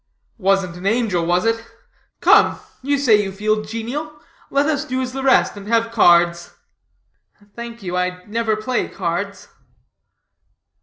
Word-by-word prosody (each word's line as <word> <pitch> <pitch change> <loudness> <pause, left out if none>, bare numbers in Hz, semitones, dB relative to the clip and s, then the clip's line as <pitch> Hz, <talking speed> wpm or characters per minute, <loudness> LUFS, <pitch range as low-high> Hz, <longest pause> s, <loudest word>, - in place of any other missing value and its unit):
"Wasn't 195 -3 +1
an 185 +2 -4
angel, 215 -6 +1
was 180 +3 +1
it? 225 0 0 0.6
Come, - - +5 0.2
you 285 +2 0
say 230 -7 +4
you 195 -1 -4
feel 215 +2 0
genial, 250 +8 -5 0.3
let 280 +1 +2
us 305 -2 0
do 255 -3 -3
as 255 -1 -3
the 270 - -4
rest, 265 -4 +3
and 200 0 -10
have 230 0 +1
cards." 175 -5 +3 1.0
"Thank 235 -2 -8
you, 180 -1 -4
I 180 0 -2
never 220 0 -1
play 240 +3 -2
cards." 195 +2 -4
215 Hz, 145 wpm, -20 LUFS, 190-245 Hz, 1.0 s, Come